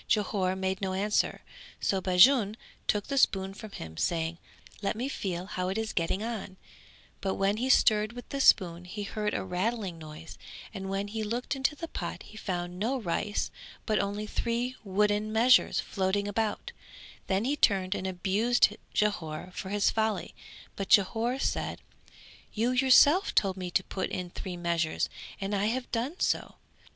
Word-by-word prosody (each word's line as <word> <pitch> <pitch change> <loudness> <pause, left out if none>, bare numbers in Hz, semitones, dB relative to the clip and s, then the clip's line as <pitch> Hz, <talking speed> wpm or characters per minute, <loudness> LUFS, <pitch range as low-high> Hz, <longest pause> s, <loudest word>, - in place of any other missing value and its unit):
Jhore 195 -3 +1
made 190 0 -2
no 190 -1 -1
answer, 205 +2 0 0.4
so 195 -1 0
Bajun 205 +4 +5 0.3
took 210 -1 +1
the 275 -1 0
spoon 195 -4 +2
from 215 +2 -9
him, 80 - -9
saying 165 0 -1 0.4
"Let 200 - -1
me 245 +4 -2
feel 185 -9 -3
how 185 -2 -3
it 190 - -2
is 220 0 -2
getting 180 +4 0
on", 215 -5 -5 0.6
but 190 -1 -1
when 195 +2 +1
he 255 +3 -1
stirred 215 -3 +4
with 245 0 -9
the 275 - -2
spoon 175 -7 +4
he 205 +3 -5
heard 210 +1 -2
a - - -1
rattling 190 0 -2
noise 155 +1 -10 0.3
and 195 -2 -5
when 195 +1 -2
he 220 +1 -3
looked 240 +6 -2
into 275 +2 0
the 330 +3 -6
pot - - -5
he - - -14
found 180 -3 -4
no 250 +6 0
rice 205 +1 -2 0.3
but 215 -2 +1
only 205 +1 -2
three 235 +3 -2
wooden 210 +2 +1
measures 240 +3 +5
floating 195 +1 -1
about; 215 +1 -2 0.6
then 195 +3 +1
he 280 +3 +1
turned 195 -8 +2
and 190 - -3
abused 200 +6 +2 0.2
Jhore 180 -5 -1
for 190 - -6
his 205 0 +2
folly, 220 -1 -1 0.4
but 195 - -4
Jhore 225 +4 +3
said - - -2 0.7
"You 230 +3 +1
yourself 270 +8 +5
told 195 -2 +3
me 185 -2 -5
to 190 +2 +1
put 190 0 -3
in 180 -1 -4
three 180 -1 -6
measures 170 -2 0 0.3
and 195 +1 -3
I 200 0 +1
have 245 +3 -2
done 255 +10 -2
so." - - 0
205 Hz, 170 wpm, -29 LUFS, 185-225 Hz, 0.7 s, Bajun